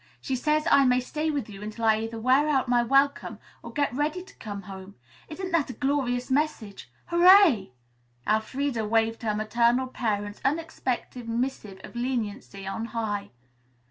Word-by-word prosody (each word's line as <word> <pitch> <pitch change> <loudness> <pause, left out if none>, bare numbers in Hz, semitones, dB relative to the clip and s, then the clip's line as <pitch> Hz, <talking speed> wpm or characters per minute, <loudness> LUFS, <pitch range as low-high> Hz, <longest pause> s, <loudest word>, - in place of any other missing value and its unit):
She 265 - -2
says 305 +5 +1
I 280 - +6
may 250 -1 +4
stay 305 +5 -3
with 290 -3 -2
you 200 -2 -10
until 215 +2 -5
I 220 -1 +4
either 225 0 -5
wear 260 +6 +3
out 265 -3 +1
my 245 0 +3
welcome 275 +4 +2 0.2
or - - -9
get 285 -4 0
ready 300 +6 -1
to 380 - -17
come 205 -2 -7
home. 190 +1 -10 0.3
Isn't 370 +4 -5
that 330 -5 +1
a - - -4
glorious 260 -1 -1
message? 255 - -2
Hooray!" 345 - +6 0.5
Elfreda 230 +3 0
waved 225 +1 +1
her 215 -3 -1
maternal 235 +4 +2
parent's 205 -5 -3
unexpected 265 -5 -2
missive 230 -5 -3
of - - -11
leniency 225 -5 -3
on 195 +4 -4
high. 205 -3 -2
245 Hz, 160 wpm, -26 LUFS, 215-285 Hz, 0.5 s, I